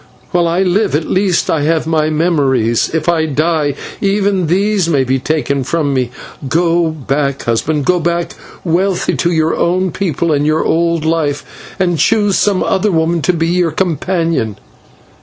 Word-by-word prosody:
While 175 -1 +2
I 175 +3 +1
live, 190 0 +1
at 155 +1 -1
least 185 -2 +1
I 160 - 0
have 160 +2 +1
my 155 -1 +1
memories; 140 -8 +1
if 160 0 -2
I 165 -2 +2
die, 150 0 0 0.3
even 195 -3 +1
these 195 +1 +1
may 140 -5 +2
be 130 +1 0
taken 140 -1 -1
from 145 +1 -1
me. 130 -3 0 0.4
Go 170 +2 +2
back, 140 -2 -2
husband, 140 +5 -1
go 180 +2 +2
back 170 +1 -2 0.3
wealthy 180 +2 0
to 175 - +1
your 160 -1 +1
own 185 +1 0
people 170 -3 -1
and 145 -1 +1
your 155 +1 +1
old 170 -1 +1
life, 155 -3 -3
and 175 -3 +1
choose 205 -3 +2
some 200 -3 +1
other 195 +2 +1
woman 165 0 +1
to 180 - +1
be 165 0 0
your 175 -1 +1
companion. 165 - -1
165 Hz, 165 wpm, -14 LUFS, 150-180 Hz, 0.4 s, While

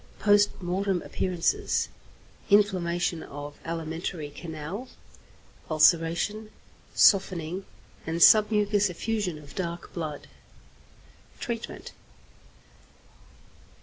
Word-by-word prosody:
Post 205 0 +3
Mortem 185 +1 -1
Appearances. 185 - 0 0.6
Inflammation 180 -5 +2
of 145 0 -9
alimentary 165 -1 -4
canal; 160 - -7 0.8
ulceration, 170 +7 +2 0.5
softening, 185 -2 +3 0.4
and 160 +1 -1
submucous 210 0 +5
effusion 185 -1 -2
of 145 -2 -13
dark 170 -2 -5
blood. 155 -4 -5 1.1
_Treatment. 235 -2 -5
180 Hz, 70 wpm, -27 LUFS, 165-205 Hz, 1.1 s, submucous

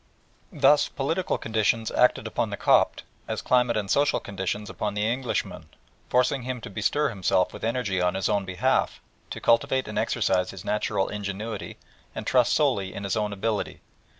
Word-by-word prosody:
Thus 150 0 +4
political 165 +7 -1
conditions 110 0 0
acted - - +3
upon - - -1
the - - -4
Copt - - +3 0.2
as - - -3
climate 125 -2 +2
and 105 -2 -2
social 140 +8 +2
conditions 100 +1 -4
upon 105 0 -3
the 105 0 0
Englishman, 125 +2 -3 0.4
forcing 125 +2 +2
him 125 0 -4
to 105 - -8
bestir 110 +9 +1
himself 95 -3 +1
with - - -10
energy 110 -5 0
on 90 0 +1
his 95 - 0
own 100 -1 +1
behalf, 95 -1 0 0.3
to - - -6
cultivate 125 +3 +2
and - - -2
exercise 90 -1 +1
his 95 +1 -9
natural 105 -2 0
ingenuity, 105 +1 -5 0.4
and - - -5
trust 125 -1 +3
solely 115 -11 +1
in 100 - -5
his 100 - -1
own 105 -1 -1
ability. 105 +1 -3
105 Hz, 170 wpm, -26 LUFS, 100-125 Hz, 0.4 s, Thus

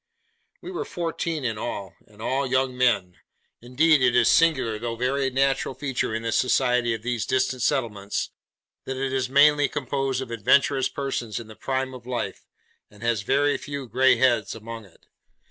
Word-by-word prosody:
We 360 - -7
were 360 - -3
fourteen 165 -3 -3
in 110 -3 -2
all, 100 -5 -5
and 105 +1 -13
all 135 +2 0
young 130 0 0
men: 115 -8 +1 0.4
indeed 140 +5 +3
it 125 -1 +3
is 120 -2 +5
a - - +6
singular 130 -10 +3
though 115 0 -3
very 135 +3 0
natural 135 0 0
feature 135 -4 -2
in 115 - -3
the 115 - -1
society 125 -2 +2
of 110 - -10
these 120 -2 -1
distant 130 -1 0
settlements, 110 -7 -1 0.5
that 130 0 -4
it 135 0 -2
is 130 -1 -1
mainly 145 +1 +5
composed 135 -2 -2
of 120 - -10
adventurous 135 +4 +2
persons 125 -6 -3
in 120 - -8
the 110 0 -13
prime 130 +1 -2
of 125 -1 -11
life, 125 -1 -4 0.4
and 105 +2 -15
has 120 -2 +1
very 140 +6 +1
few 140 -2 -6
grey 130 +4 +4
heads 120 -6 +2
among 115 0 -8
it. 95 - -23
130 Hz, 180 wpm, -25 LUFS, 115-135 Hz, 0.5 s, a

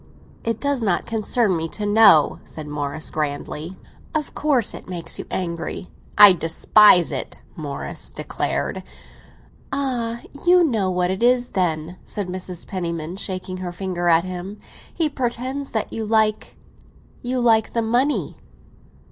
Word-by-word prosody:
"It 230 -1 -2
does 280 -3 0
not 195 -6 0
concern 220 -2 +1
me 165 0 -2
to 210 - -4
know," 205 -7 +6
said 155 - -9
Morris 145 +1 -4
grandly. 150 +3 -4 0.4
"Of 300 -2 -2
course 275 -7 +1
it - - -10
makes 170 -2 -5
you - - -6
angry." 170 0 -4 0.3
"I 205 -2 +10
despise 175 +2 +5
it," 135 - -4 0.2
Morris 145 -3 -6
declared. - - -3 0.9
"Ah, 245 -4 -2 0.3
you 360 0 +7
know 220 - +1
what 180 0 0
it 190 - -3
is, 245 0 +3
then?" 170 -1 -1
said 200 -3 -4
Mrs. 180 -1 -5
Penniman, 170 -3 -4
shaking 185 -1 -4
her 180 -1 -5
finger 175 -1 -3
at 165 0 +5
him. 185 +2 -6 0.3
"He 330 -2 0
pretends 260 0 -3
that 220 -2 -2
you 225 - -3
like—you 220 +3 -3
like 225 -2 +3
the 230 - +1
money." 245 +6 0
195 Hz, 140 wpm, -22 LUFS, 175-235 Hz, 0.9 s, I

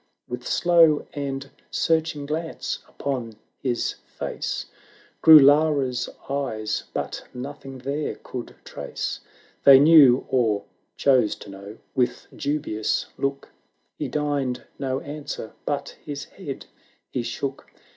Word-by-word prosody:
With 125 0 -6
slow 165 -3 +4
and 140 -1 -4 0.2
searching 160 -3 0
glance 160 +3 -3
upon 125 -5 -4 0.3
his 125 -3 0 0.2
face - - -3 0.6
Grew 160 -1 +11
Lara's 140 -3 +4 0.2
eyes, 120 -6 -2
but - - -4
nothing 135 +1 -7
there 140 +4 -3
could 125 -2 -8
trace - - -5 0.4
They 140 -1 +10
knew, 140 -4 +7
or 115 -6 +1 0.3
chose 130 -6 +3
to 100 - -11
know 100 +3 -10
— - - -42
with 125 -2 0
dubious 140 -7 -1
look 140 0 -2 0.4
He - - -4
deigned 145 -4 -1 0.2
no 135 -1 -1
answer, 145 -6 -6
but 140 -1 -2
his 145 -1 -5
head - - -8 0.5
he 125 - -1
shook. 130 +4 -4
140 Hz, 115 wpm, -24 LUFS, 125-145 Hz, 0.6 s, Grew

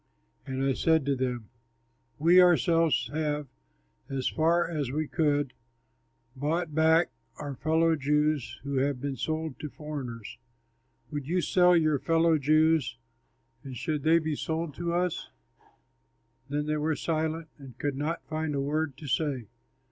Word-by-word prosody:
And 130 0 -2
I 135 0 +2
said 160 +1 +2
to 140 -1 +1
them, 125 -4 -3 0.7
"We 175 +4 +6
ourselves 165 -3 +3
have, 150 -1 -1 0.6
as 135 -2 -2
far 165 +2 +2
as 150 -6 -2
we 150 +3 -2
could, 145 -4 +1 0.8
bought 155 +4 -1
back 160 +2 +4 0.3
our 145 -1 -5
fellow 160 +4 +2
Jews 150 -1 0
who 140 -1 -2
have 135 0 +1
been 140 0 -3
sold 155 0 -3
to 150 - -5
foreigners. 130 -8 -7 0.7
Would 145 -3 -4
you 180 +3 +1
sell 180 0 +4
your 155 -3 +2
fellow 165 0 +3
Jews, 155 -3 +3 0.7
and 130 -2 -7
should 150 +4 -2
they 160 +3 +4
be 160 -2 -1
sold 160 0 -3
to 170 0 -2
us?" 175 0 -1 1.2
Then 145 +1 -1
they 155 0 0
were 155 +1 0
silent 160 0 -2
and 130 -4 -12
could 145 +1 -2
not 150 +4 -3
find 155 -1 -2
a - - 0
word 145 0 -1
to 150 - -9
say. 130 -4 -1
150 Hz, 150 wpm, -28 LUFS, 140-160 Hz, 1.2 s, We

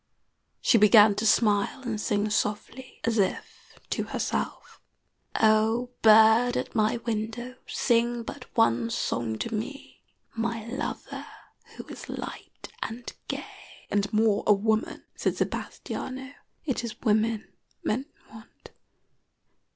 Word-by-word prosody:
She 235 - +4
began 210 0 +7
to 220 +1 +1
smile 210 +4 +2
and 225 -4 -3
sing 210 0 0
softly, 220 +5 -3
as 230 -1 +1
if 190 -2 -3
to - - -1
herself: - - -3 0.6
"Oh, 220 +3 +3
bird 220 +3 +6
at - - -3
my 220 0 +2
window, 230 +2 -3
Sing 235 -1 +1
but 255 +3 -8
one 115 - +3
song 115 -1 -2
to 230 - -4
me, 270 +6 -6 0.3
My 230 -1 -2
lover 245 +3 -5 0.5
who - - -7
is - - -10
light - - -8
and 235 +2 -5
gay." - - -4 0.5
"And 205 0 +1
more 215 -1 +2
a 210 - +8
woman," 215 +2 0
said - - -1
Sebastiano. 265 +1 -4 0.3
"It 265 -5 -1
is 230 -1 -6
women 220 0 +1 0.3
men 260 +6 -1 0.2
want." 220 +1 -15
220 Hz, 120 wpm, -27 LUFS, 210-240 Hz, 0.6 s, a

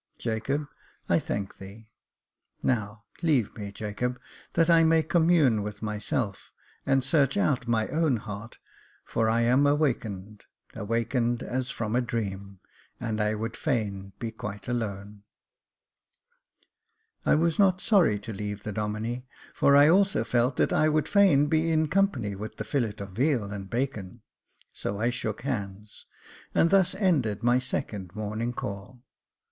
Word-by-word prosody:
Jacob, 130 +6 -2 0.4
I - - +3
thank 100 -1 -4
thee! 105 +3 -12 0.7
Now 110 -3 -1 0.2
leave 145 - +2
me, 100 -2 -6
Jacob, 110 +5 -3 0.3
that 165 - +3
I 165 -1 +6
may 160 0 +4
commune 160 - +3
with 105 +1 -6
myself, 105 0 -3 0.4
and 135 -1 +3
search 140 +3 +2
out 135 -10 +1
my 110 -2 +1
own 155 -5 +1
heart, 105 +2 -8 0.5
for 110 -1 0
I 115 +1 +2
am 125 +5 +4
awakened 110 -9 -1
— - - -32
awakened 115 +2 -1
as 125 0 -3
from 110 -3 -3
a 125 - +3
dream, 100 -5 -4 0.4
and 110 -2 -2
I 105 +1 +1
would 115 +2 -4
fain 100 -8 -2
be 115 -1 -4
quite 105 -2 -7
alone." 105 -4 -4 2.0
I - - +4
was 165 +2 +1
not 190 -2 +4
sorry 180 - +3
to 110 +2 -6
leave 105 0 -5
the 105 - -4
Domine, 110 +4 -3 0.3
for 140 - +4
I 145 +1 +8
also 190 - +4
felt 120 +3 +1
that - - +2
I 155 - +3
would 155 0 +1
fain 190 -9 +5
be 160 +2 +1
in 155 -1 +2
company 150 - +1
with 105 +2 -7
the - - -3
fillet 120 -8 -1
of 100 0 -7
veal 120 -2 0
and 100 -1 -6
bacon, 120 -7 -3 0.5
so 100 - -4
I 120 +2 +1
shook 110 -3 -4
hands, 105 -5 -5 0.5
and 165 - +4
thus 190 -2 +4
ended 140 - +1
my 120 +1 +4
second 100 -7 -4
morning 110 +3 -3
call. 105 +2 -7
115 Hz, 150 wpm, -27 LUFS, 105-145 Hz, 2.0 s, I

